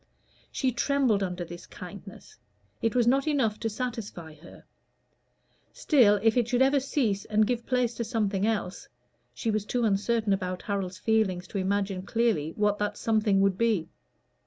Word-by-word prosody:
She 260 -2 0
trembled 250 -3 +1
under 180 -2 -3
this 175 +1 -10
kindness: 430 - -11 0.4
it 225 0 0
was 245 -2 +3
not 270 +4 +2
enough 250 -8 +1
to 225 - -2
satisfy 215 -8 -5
her; 155 +3 -15 1.1
still, 220 -9 +4
if 225 -1 +4
it 240 -3 +2
should 245 +1 +3
ever 275 +1 +3
cease 245 -7 -1
and 215 0 +2
give 240 +1 -2
place 250 -2 +1
to 235 - -1
something 210 -4 0
else 205 -4 -3 0.5
she 225 - -1
was 215 -1 -1
too 240 +3 -1
uncertain 215 +1 +1
about 185 -1 -3
Harold's 195 -2 -3
feelings 190 -5 0
to 200 - -3
imagine 195 0 -1
clearly 210 -7 0
what 205 -1 +1
that 210 0 -2
something 215 -3 +2
would 195 -1 +1
be. 220 -8 +1
215 Hz, 160 wpm, -27 LUFS, 195-240 Hz, 1.1 s, still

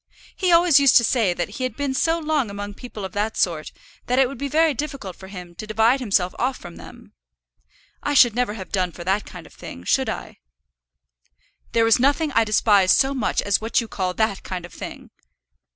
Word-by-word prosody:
He 370 -2 0
always 335 -3 +6
used 275 -2 +6
to 235 - +4
say 225 -5 +2
that 175 0 -2
he 235 +5 -6
had 255 - -3
been 285 -2 -2
so 325 +5 +1
long 305 -7 -1
among 205 0 -6
people 215 -2 -8
of 190 - -7
that 215 +1 -2
sort, 160 -4 -1 0.4
that 250 - +1
it 265 -1 +5
would 275 - -9
be 280 - -2
very 315 +2 +2
difficult 275 -9 -5
for 190 - -12
him 180 -3 -10
to 215 +5 -9
divide 225 +5 +2
himself 195 -7 0
off 255 +1 0
from 175 -2 -11
them. - - -14 0.9
I 290 - -1
should 240 -4 +6
never 240 -3 -1
have 190 -4 -9
done 185 -2 0
for 175 - -9
that 195 +4 -1
kind - - -10
of - - -16
thing; 85 - -10
should - - +1
I?" - - -7 1.3
"There 230 -1 +3
is 225 +2 +4
nothing 285 +4 +2
I 230 - +3
despise 205 -3 +3
so 270 +1 +3
much 255 -6 -1
as 200 0 +1
what 225 +1 +1
you 230 - -4
call 185 -3 -3
that 220 -3 0
kind 180 -2 -6
of 175 - -14
thing." - - -9
225 Hz, 215 wpm, -22 LUFS, 195-270 Hz, 1.3 s, always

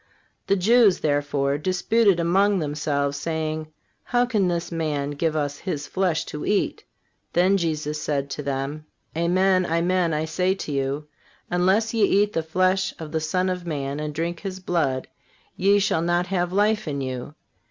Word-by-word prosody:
The 200 - +3
Jews, 210 +1 +4
therefore, 145 -1 0
disputed 190 +3 +2
among 195 +4 +3
themselves, 145 -2 -1
saying: 155 0 -3 0.3
How 245 0 +2
can 215 -6 +1
this 175 -1 -2
man 150 -4 -1
give 155 +2 -1
us 145 -1 -2
His 155 -7 -4
flesh 180 -2 0
to 150 - -6
eat? 205 -1 0 0.5
Then 185 +3 +4
Jesus 155 -4 -1
said 140 -2 -1
to 150 - -4
them: 140 +2 -3 0.3
Amen, 185 +3 +3
amen, 175 +1 +1
I 155 0 0
say 180 +4 0
to 155 - -6
you: 140 +2 -2 0.4
Unless 190 +6 +2
ye 225 - 0
eat 205 +1 +3
the 165 - +1
flesh 185 +3 +1
of 160 -2 -8
the 160 - 0
Son 180 +4 0
of 180 -1 -3
Man 140 -2 -3
and 150 0 -3
drink 165 +3 -3
His 190 -2 -5
blood, 155 -8 -1 0.5
ye 200 +2 +4
shall 195 -5 +1
not 175 +1 +1
have 180 -2 -1
life 210 +1 +2
in 140 -2 -2
you. 130 +2 -5
170 Hz, 165 wpm, -24 LUFS, 150-185 Hz, 0.5 s, Jews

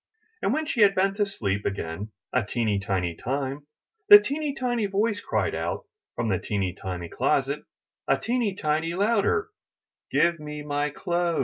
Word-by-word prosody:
And - - +1
when 315 0 0
she 270 -7 0
had 200 -1 +6
been 195 +1 +2
to 205 0 0
sleep 100 - -2
again 100 +2 -4 0.2
a 130 - +3
teeny 105 -1 0
tiny 95 -4 -1
time, 135 - -3 0.4
the 415 - +14
teeny 295 -5 -2
tiny 240 -5 0
voice 205 +2 0
cried - - 0
out - - -3 0.3
from 120 - -1
the 95 -4 +1
teeny 95 -4 -2
tiny 90 -2 -5
closet - - 0 0.5
a - - +3
teeny 235 -4 -1
tiny 160 +1 0
louder: 230 - +2 0.6
Give 170 -1 +3
me 150 0 -6
my 145 0 -1
clothes!" 170 +2 -1
155 Hz, 165 wpm, -26 LUFS, -, 0.6 s, the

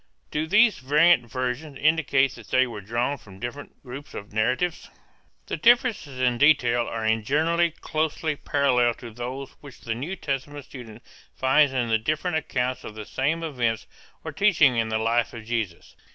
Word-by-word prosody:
Do 155 +1 -1
these 215 +4 +4
variant 145 -1 +4
versions 130 +3 -3
indicate 140 -3 +2
that 115 - -13
they 130 0 +3
were 115 -4 -7
drawn 120 +7 -2
from 95 -4 -15
different 120 +6 -8
groups 135 +2 -9
of 100 0 -8
narratives? 130 +11 -1 0.6
The - - -4
differences 235 - +2
in 125 -2 +1
detail 120 -5 +4
are 110 -1 -4
in 110 0 +1
general 165 +7 +2
closely 155 0 -1
parallel 125 -5 +1
to 120 - -10
those 125 +3 -6
which 140 -4 -13
the 115 - -3
New 145 +11 -4
Testament 140 -2 -4
student 120 -5 -11 0.3
finds 135 +2 +3
in 125 -3 -1
the 110 0 +2
different 155 +8 -1
accounts 130 -4 -2
of 110 - -9
the 110 -1 -7
same 155 +9 -1
events 120 -8 -1 0.4
or - - -5
teachings 160 - +4
in 110 -1 0
the 110 - 0
life 115 +2 0
of 115 -2 -9
Jesus. 110 -7 -4
130 Hz, 170 wpm, -25 LUFS, 120-150 Hz, 0.6 s, these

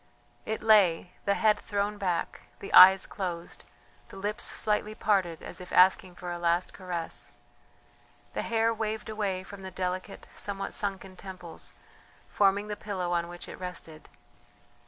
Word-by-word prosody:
It 220 0 -3
lay, 190 -6 +4
the 200 -1 +2
head 215 -2 +3
thrown 205 0 -2
back, 180 -3 -2
the 195 - -8
eyes 190 +1 +9
closed, 175 -3 -5 0.4
the - - -11
lips 205 +2 -2
slightly 210 0 +1
parted 190 -7 0
as 180 - -6
if 180 - -10
asking 185 0 +4
for 180 -1 -6
a 175 - -4
last 170 +1 +1
caress. 180 -3 -5 1.0
The - - -1
hair 230 0 +1
waved 220 -1 -3
away 200 -4 -2
from 200 0 -11
the 190 - -6
delicate, 185 0 -4
somewhat 195 -1 -4
sunken 195 -2 -3
temples, 180 -4 -9 0.5
forming 200 +1 +2
the 210 - -3
pillow 190 -4 -4
on 170 0 0
which 175 0 -9
it - - -9
rested. 170 -4 -7
190 Hz, 150 wpm, -29 LUFS, 180-210 Hz, 1.0 s, eyes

